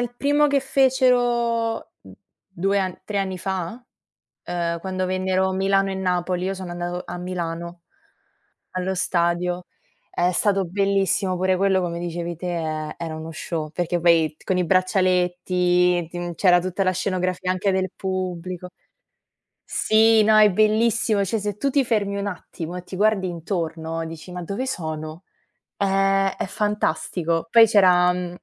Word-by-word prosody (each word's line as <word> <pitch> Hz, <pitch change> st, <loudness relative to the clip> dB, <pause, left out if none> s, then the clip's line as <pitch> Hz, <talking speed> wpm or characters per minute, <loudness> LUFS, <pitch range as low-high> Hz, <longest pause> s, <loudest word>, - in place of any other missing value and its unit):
il 245 Hz, 0 st, -2 dB
primo 290 Hz, +3 st, +2 dB
che 280 Hz, -1 st, +2 dB
fecero 245 Hz, -4 st, +1 dB, 0.5 s
2 195 Hz, +1 st, 0 dB
an 185 Hz, -2 st, -2 dB
3 205 Hz, -, -4 dB
anni 190 Hz, -2 st, -1 dB
fa? 190 Hz, +5 st, -4 dB, 0.6 s
Ehm, 170 Hz, -1 st, -2 dB
quando 185 Hz, 0 st, -2 dB
vennero 185 Hz, 0 st, 0 dB
Milano 195 Hz, +1 st, +1 dB
e 190 Hz, -, -3 dB
Napoli, 180 Hz, -1 st, -1 dB
io 190 Hz, -, -1 dB
sono 185 Hz, -2 st, -7 dB
andato 175 Hz, +1 st, -4 dB
a 180 Hz, -, -6 dB
Milano, 170 Hz, -1 st, -5 dB, 0.9 s
allo 185 Hz, +1 st, -2 dB
stadio. 175 Hz, 0 st, 0 dB, 0.5 s
È 175 Hz, +1 st, +1 dB
stato 195 Hz, 0 st, +1 dB
bellissimo 195 Hz, 0 st, +1 dB
pure 185 Hz, +1 st, +1 dB
quello, 190 Hz, 0 st, +2 dB
come 170 Hz, -1 st, -3 dB
dicevi 170 Hz, 0 st, -4 dB
te, 180 Hz, +3 st, -7 dB
e 155 Hz, -2 st, -3 dB
era 165 Hz, -2 st, -5 dB
uno 160 Hz, +1 st, -7 dB
show, 155 Hz, -2 st, -4 dB
perché, 175 Hz, +1 st, -1 dB
poi, 165 Hz, -2 st, +3 dB
con 185 Hz, -, 0 dB
i 180 Hz, -, +1 dB
braccialetti, 180 Hz, -1 st, +2 dB
tin 175 Hz, 0 st, -5 dB
c'era 180 Hz, 0 st, +4 dB
tutta 185 Hz, +2 st, -2 dB
la 185 Hz, -, +2 dB
scenografia 185 Hz, 0 st, -1 dB
anche 190 Hz, +2 st, 0 dB
del 190 Hz, -1 st, 0 dB
pubblico. 185 Hz, -1 st, -4 dB, 1.0 s
Sì, 220 Hz, 0 st, +4 dB
no, 215 Hz, 0 st, +5 dB
è 210 Hz, -2 st, +7 dB
bellissimo, 215 Hz, 0 st, +2 dB
cioè, 220 Hz, +4 st, -1 dB
se 205 Hz, 0 st, -4 dB
tu 280 Hz, -, 0 dB
ti 275 Hz, -2 st, +2 dB
fermi 200 Hz, -4 st, 0 dB
un 200 Hz, -, -3 dB
attimo 175 Hz, -3 st, -6 dB
e 180 Hz, -, -7 dB
ti 185 Hz, -, -9 dB
guardi 205 Hz, -1 st, +2 dB
intorno, 165 Hz, -2 st, -3 dB
dici: 165 Hz, +2 st, -9 dB
“Ma 180 Hz, 0 st, -6 dB
dove 200 Hz, +9 st, -3 dB
sono?”. 160 Hz, -6 st, -5 dB, 0.5 s
È 195 Hz, 0 st, +2 dB
è -, -, -2 dB
fantastico. 175 Hz, -5 st, -1 dB
Poi, 230 Hz, -1 st, +8 dB
c'era 180 Hz, -4 st, +5 dB
mhmm, 180 Hz, -1 st, -5 dB
185 Hz, 150 wpm, -23 LUFS, 175-200 Hz, 1.0 s, Poi